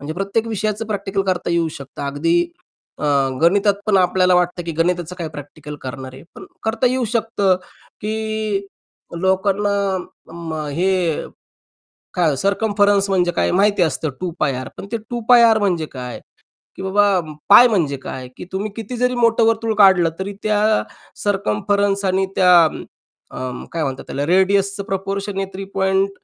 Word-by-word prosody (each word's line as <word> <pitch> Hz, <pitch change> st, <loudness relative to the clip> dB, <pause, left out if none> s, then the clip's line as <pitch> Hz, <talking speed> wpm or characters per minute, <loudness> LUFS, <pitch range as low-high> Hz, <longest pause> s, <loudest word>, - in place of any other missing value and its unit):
म्हणजे 145 Hz, +3 st, -5 dB
प्रत्येक 200 Hz, +4 st, -1 dB
विषयाचं 215 Hz, 0 st, -2 dB
प्रॅक्टिकल 200 Hz, -2 st, -2 dB
करता 180 Hz, -2 st, -1 dB
येऊ 170 Hz, -1 st, +1 dB
शकतं 140 Hz, +1 st, -9 dB
अगदी 155 Hz, +5 st, 0 dB, 0.6 s
अ, -, -, -4 dB, 0.4 s
गणितात 200 Hz, +4 st, +4 dB
पण 210 Hz, -2 st, +3 dB
आपल्याला 185 Hz, 0 st, +3 dB
वाटतं 180 Hz, 0 st, +1 dB
की 170 Hz, -, -4 dB
गणिताचं 175 Hz, 0 st, 0 dB
काय 165 Hz, -2 st, -3 dB
प्रॅक्टिकल 150 Hz, 0 st, -9 dB
करणार 130 Hz, 0 st, -7 dB
आहे? 135 Hz, -, -12 dB
पण -, -, -10 dB, 0.2 s
करता 225 Hz, +3 st, 0 dB
येऊ 255 Hz, 0 st, +1 dB
शकतं 215 Hz, -5 st, +1 dB, 0.4 s
की 215 Hz, -2 st, -2 dB, 0.5 s
लोकांना 195 Hz, +2 st, +1 dB, 0.6 s
अं, 165 Hz, -1 st, -7 dB
अं, 155 Hz, -1 st, -4 dB
हे 175 Hz, 0 st, 0 dB, 0.9 s
काय 165 Hz, -5 st, +2 dB
सर्कम्फरन्स 200 Hz, +2 st, +2 dB
म्हणजे 180 Hz, -2 st, +2 dB
काय -, -, +1 dB
माहिती 200 Hz, +1 st, +3 dB
असतं, 155 Hz, -2 st, 0 dB
2πr. 150 Hz, -7 st, -2 dB
पण -, -, -8 dB
ते -, -, +1 dB
2πr 235 Hz, -1 st, +5 dB
म्हणजे 180 Hz, -6 st, 0 dB
काय? 125 Hz, -2 st, -7 dB, 0.6 s
की -, -, -8 dB
बाबा 200 Hz, 0 st, +3 dB, 0.3 s
π 240 Hz, +5 st, +9 dB
म्हणजे 165 Hz, -, 0 dB
काय? 130 Hz, -1 st, -7 dB
की -, -, -8 dB
तुम्ही 200 Hz, +2 st, -3 dB
किती 230 Hz, +2 st, -6 dB
जरी 250 Hz, +1 st, +1 dB
मोठं 230 Hz, -1 st, +3 dB
वर्तुळ 225 Hz, 0 st, +1 dB
काढलं 190 Hz, -5 st, +6 dB
तरी 195 Hz, +2 st, -4 dB
त्या 210 Hz, -1 st, +1 dB, 0.6 s
सर्कम्फरन्स 200 Hz, -, 0 dB
आणि 190 Hz, 0 st, +1 dB
त्या 180 Hz, -2 st, +6 dB
अं, 155 Hz, -, -2 dB, 0.6 s
अं, 125 Hz, -1 st, -5 dB
काय 165 Hz, -2 st, -2 dB
म्हणतात 135 Hz, -2 st, -4 dB
त्याला 140 Hz, +1 st, -2 dB
रेडियसचं 195 Hz, +3 st, +2 dB
प्रपोर्शन 195 Hz, +1 st, -3 dB
आहे 195 Hz, -, -1 dB
3. 190 Hz, 0 st, 0 dB
190 Hz, 150 wpm, -20 LUFS, 170-205 Hz, 0.9 s, π